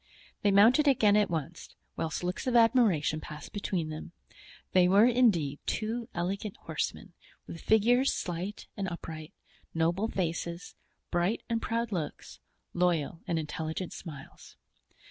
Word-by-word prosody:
They 205 - +3
mounted 230 +9 +6
again 215 -7 +5
at 210 -1 +3
once, 165 0 -5 0.2
whilst 160 +2 -3
looks 180 +7 -3
of 250 - +1
admiration 220 - +4
passed 150 -1 -9
between 185 -5 -2
them. 155 +2 -7 0.6
They 180 -1 +5
were 200 +4 +6
indeed 210 - +3
two 225 +2 -2
elegant 195 +4 -3
horsemen, - - -4 0.3
with 165 - -9
figures 240 +5 +4
slight 180 +4 -4
and 195 -1 -3
upright, 160 -2 -7 0.4
noble 170 +6 +1
faces, 170 -3 -3 0.4
bright 175 +6 0
and 230 -1 0
proud 230 0 -2
looks, 170 -6 -5 0.3
loyal 170 -3 0
and 170 - 0
intelligent 160 +3 -4
smiles. 145 -6 -11
180 Hz, 130 wpm, -30 LUFS, 165-220 Hz, 0.6 s, mounted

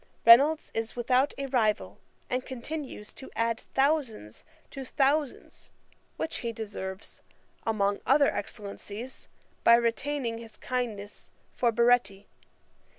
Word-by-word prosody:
Reynolds 280 +7 +7
is 225 0 -3
without 255 +3 +2
a 275 - -3
rival, 225 -6 0 0.3
and 255 0 -1
continues 260 -3 -6
to 265 - -10
add 230 0 -1
thousands 270 - 0 0.3
to 270 - -6
thousands, 280 +1 -1 0.5
which 320 - -3
he 235 -2 -3
deserves, 200 -3 -7 0.5
among 205 -2 +1
other 280 +2 +4
excellencies, 205 +4 -7 0.4
by 235 - +8
retaining 235 +1 -1
his 225 -1 -11
kindness 220 -5 -4 0.3
for 240 -2 +2
Baretti. 235 -4 +2
235 Hz, 110 wpm, -28 LUFS, 220-270 Hz, 0.5 s, by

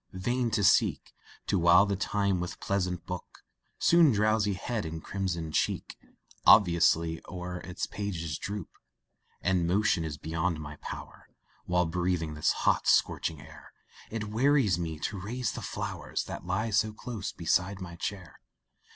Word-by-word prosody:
vain 120 +6 0
to 110 -2 0
seek - - +3 0.3
To 100 - +1
while 85 +3 +6
the 100 -1 -1
time 100 -1 0
with 90 0 -5
pleasant 90 -3 -1
book, 90 -1 -8 0.3
Soon 170 -4 +5
drowsy 105 -1 +2
head 110 +3 -3
and 80 0 -6
crimsoned 85 -5 -3
cheek - - -1 0.5
Oblivious 85 -6 +6 0.3
o'er 90 -1 -5
its 90 0 -4
pages 85 -7 -4
droop 100 -3 -5 0.7
And 90 -3 +2
motion 95 -2 +2
is 75 -2 -4
beyond 80 +1 -2
my 75 -1 -8
power, - - -9 0.4
While 90 0 +2
breathing 85 -1 -1
this 75 0 +2
hot, - - +3
scorching 80 -4 +2
air, 75 0 -14 0.4
It 110 -1 -4
wearies 120 - +3
me 80 -2 -3
to 100 -3 -3
raise 115 +3 -2
the - - -6
flowers, - - -4
That - - -7
lie 110 +5 -1
so 105 +1 +2
close 110 -2 -5
beside 90 +3 0
my 85 -3 -7
chair. 90 -1 -6
90 Hz, 150 wpm, -29 LUFS, 85-105 Hz, 0.7 s, while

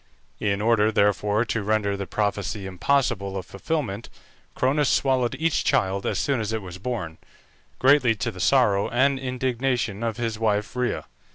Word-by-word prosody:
In 100 -1 0
order, 110 -1 +3
therefore, 105 +1 +2
to 115 -1 -2
render 105 -1 0
the 100 -1 -5
prophecy 105 -1 -2
impossible 100 -1 0
of 95 - -5
fulfilment, 115 - -3 0.5
Cronus 140 +3 +2
swallowed 130 -2 +1
each 165 +1 +1
child 95 -1 +1
as - - -1
soon 140 -3 0
as 110 -1 -2
it 110 -2 -3
was 90 -1 -9
born, 95 -8 -4 0.6
greatly 130 -3 +4
to 115 +2 -2
the 95 - -11
sorrow 105 -4 +3
and 135 +3 +2
indignation 125 -4 -1
of 115 -1 -2
his 115 -2 -3
wife 105 0 0
Rhea. 125 -1 -1
110 Hz, 160 wpm, -24 LUFS, 100-125 Hz, 0.6 s, greatly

